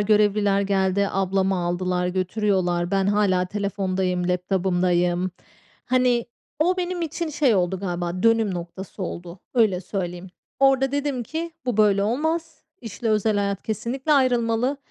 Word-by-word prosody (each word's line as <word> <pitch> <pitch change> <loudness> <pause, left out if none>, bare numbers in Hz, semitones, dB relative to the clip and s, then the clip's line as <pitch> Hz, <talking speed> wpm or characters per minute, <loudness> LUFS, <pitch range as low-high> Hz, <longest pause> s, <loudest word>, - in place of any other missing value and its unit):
görevliler 205 -1 +3
geldi, 195 0 +1
ablamı 195 0 +1
aldılar, 180 +1 -1
götürüyorlar. 185 -2 0
Ben 195 -1 +1
hâlâ 200 -3 +2
telefondayım, 190 -2 -1
laptop'ımdayım. 180 -1 +1 0.6
Hani, 250 -2 +2 0.3
o 355 +5 +2
benim 360 -1 -2
için 330 +1 -3
şey 285 -5 +2
oldu 185 0 0
galiba, 175 -1 -3
dönüm 225 -3 +3
noktası 180 +3 -7
oldu. 175 0 -6 0.2
Öyle 215 -7 +3
söyleyeyim. 180 -1 -5 0.3
Orada 270 0 +3
dedim 285 -3 -1
ki 325 +7 -4 0.2
bu 245 -4 0
böyle 205 -2 +4
olmaz. 320 +8 -1 0.2
İşle 225 0 -5
özel 215 0 +2
hayat 200 -1 -1
kesinlikle 255 +7 -2
ayrılmalı. 245 -1 +2
200 Hz, 130 wpm, -23 LUFS, 185-245 Hz, 0.6 s, böyle